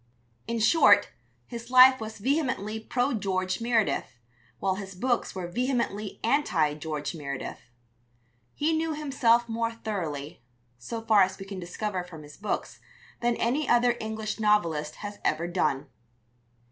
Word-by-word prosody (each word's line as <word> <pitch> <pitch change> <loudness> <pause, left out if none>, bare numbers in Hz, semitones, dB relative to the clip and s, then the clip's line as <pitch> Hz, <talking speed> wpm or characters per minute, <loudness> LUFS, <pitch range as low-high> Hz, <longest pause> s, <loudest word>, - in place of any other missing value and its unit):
In 230 - -1
short, 225 +9 +5 0.4
his 235 -1 -8
life 255 0 +8
was 220 0 -6
vehemently 260 -3 -1
pro 245 +5 0
George 185 -2 -1
Meredith, 225 - 0 0.4
while 190 -1 0
his 195 0 -7
books 245 +3 -1
were 185 -2 -4
vehemently 225 0 -2
anti 190 - +2
George 150 0 -4
Meredith. 140 -5 -5 1.0
He 315 +2 +1
knew 320 0 -1
himself 240 -6 +2
more 230 0 -1
thoroughly, 165 -11 -5 0.4
so 225 - -5
far 220 -2 +5
as 190 0 +2
we 195 - -8
can 195 -1 -7
discover 185 +2 -3
from 165 -4 -11
his 150 0 -13
books, 210 - -4 0.4
than 240 0 +1
any 260 +8 0
other 240 0 +4
English 220 0 -4
novelist 170 -9 +1
has 205 0 -7
ever 155 +2 +1
done. 175 -6 0
215 Hz, 140 wpm, -27 LUFS, 180-240 Hz, 1.0 s, life